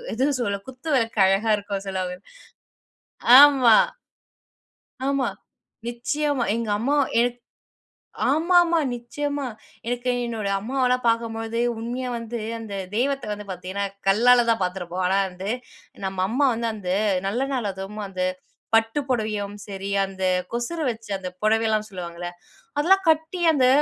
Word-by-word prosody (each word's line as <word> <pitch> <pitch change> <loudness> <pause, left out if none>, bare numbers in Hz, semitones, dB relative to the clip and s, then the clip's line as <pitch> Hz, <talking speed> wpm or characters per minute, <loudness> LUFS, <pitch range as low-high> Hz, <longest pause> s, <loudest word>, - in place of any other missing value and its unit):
எதுவோ 270 +5 +1
சொல்ல? 200 -3 -1
குத்து 260 +5 -8
விளக்கு 230 -4 0
அழகா 210 +3 +2
இருக்குன்னு 200 -1 -5
சொல்லுவாங்க. 185 -1 -3 1.2
ஆமா. 265 -6 +7 1.3
ஆமா. 275 -1 +1 0.6
நிச்சயமா. 270 +3 -1
எங்க 230 -1 -2
அம்மா 275 +6 +1 0.3
எ - - +5 1.1
ஆமாம்மா, 340 +2 +4 0.2
நிச்சயமா. 285 +4 -3 0.4
எனக்கு 245 +1 -1 0.2
என்னோட 225 -4 -3
அம்மாவலாம் 250 +2 0
பாக்கும்பொழுது, 230 0 -1 0.2
உண்மையா 245 +2 -3
வந்து 230 0 -5 0.2
அந்த 215 -3 -7 0.2
தெய்வத்த 275 +4 0
வந்து 210 0 -5
பாத்தீங்கன்னா 185 +2 -4 0.2
கல்லால 240 +4 +5
தான் 225 -3 +2
பாத்துருப்போம். 180 0 -2
ஆனா 190 +2 +2
வந்து, 185 +2 -6 0.6
நம்ம 190 -1 -2
அம்மா 270 +5 +2
வந்து, 230 +1 -2
அந்த 185 -4 -4 0.4
நல்ல 225 +6 -1
நாள் 245 -6 -1
அதுவும் 195 +3 -7
அந்த 185 -1 -3 0.5
பட்டு 225 +4 +2
புடவையும் 215 -4 -1
சரி, 195 -1 -5 0.2
அந்த 190 -1 -7 0.3
கொசுர 240 +8 -3
வச்சு 225 -2 -10
அந்த 185 -1 -6
புடவையெல்லாம் 215 0 +2
சொல்லுவாங்கல்ல, 175 -2 -6 0.5
அதெல்லாம் 380 +6 +4
கட்டி, 320 +3 +1
அந்த 265 -4 +3
225 Hz, 125 wpm, -24 LUFS, 200-255 Hz, 1.3 s, ஆமா